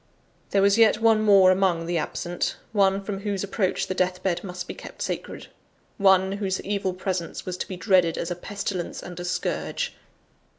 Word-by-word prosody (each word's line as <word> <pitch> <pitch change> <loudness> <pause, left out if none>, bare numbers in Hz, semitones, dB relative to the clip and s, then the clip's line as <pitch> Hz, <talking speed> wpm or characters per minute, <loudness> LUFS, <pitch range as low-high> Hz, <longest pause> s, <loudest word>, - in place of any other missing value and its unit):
(There 195 -1 +2
was 200 +2 +4
yet 220 -1 +5
one 225 -1 +4
more 195 -3 +6
among 185 -3 +1
the 170 0 0
absent 175 +3 -3 0.2
one 195 -2 +2
from 195 -1 -4
whose 200 -1 -2
approach 200 -1 -1
the - - -3
death 185 0 -1
bed 175 -2 0
must 180 -2 -6
be - - -5
kept - - -8
sacred; - - -5 0.5
one, 190 -1 +5
whose 195 -1 -2
evil 195 -2 -2
presence 185 -2 -3
was 185 - -3
to - - -4
be 185 - -6
dreaded 180 -4 +3
as 170 - -3
a - - -1
pestilence 190 -1 -4
and 175 -1 -8
a - - -4
scourge. 480 - -2
190 Hz, 185 wpm, -25 LUFS, 180-200 Hz, 0.5 s, more